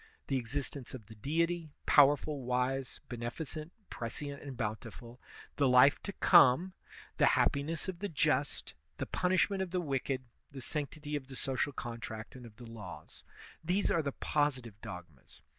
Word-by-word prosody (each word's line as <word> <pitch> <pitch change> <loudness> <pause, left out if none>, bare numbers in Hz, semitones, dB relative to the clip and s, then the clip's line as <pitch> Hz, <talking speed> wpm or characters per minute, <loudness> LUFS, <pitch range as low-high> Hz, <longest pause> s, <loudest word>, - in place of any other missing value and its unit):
The 135 - +2
existence 135 +2 -4
of 115 -5 -10
the 110 - -12
Deity, 165 +7 0 0.2
powerful, 145 0 +5
wise, 125 +1 -1
beneficent, 140 +7 -5 0.2
prescient, 140 +5 -4
and 135 -3 -7
bountiful, 115 +2 -5 0.4
the 140 -2 +4
life 125 +3 +6
to 200 - -4
come, 175 -1 +6 0.4
the - - +5
happiness 155 +5 +1
of 185 -2 -4
the 205 +1 -2
just, 150 -2 0 0.2
the - - -2
punishment 185 +2 +1
of 190 - -2
the 180 +1 0
wicked, 135 -4 -1 0.3
the 140 - -8
sanctity 150 +2 -4
of 135 -3 -4
the 135 - -9
social 135 +2 -1
contract 115 -3 -6
and 125 -2 -9
of 110 - -16
the 120 - -11
laws; 90 -9 -10 0.4
these 180 +5 +1
are 165 - +3
the 140 -2 -2
positive 130 -8 -1
dogmas. 85 -6 -10
135 Hz, 155 wpm, -33 LUFS, 120-155 Hz, 0.4 s, life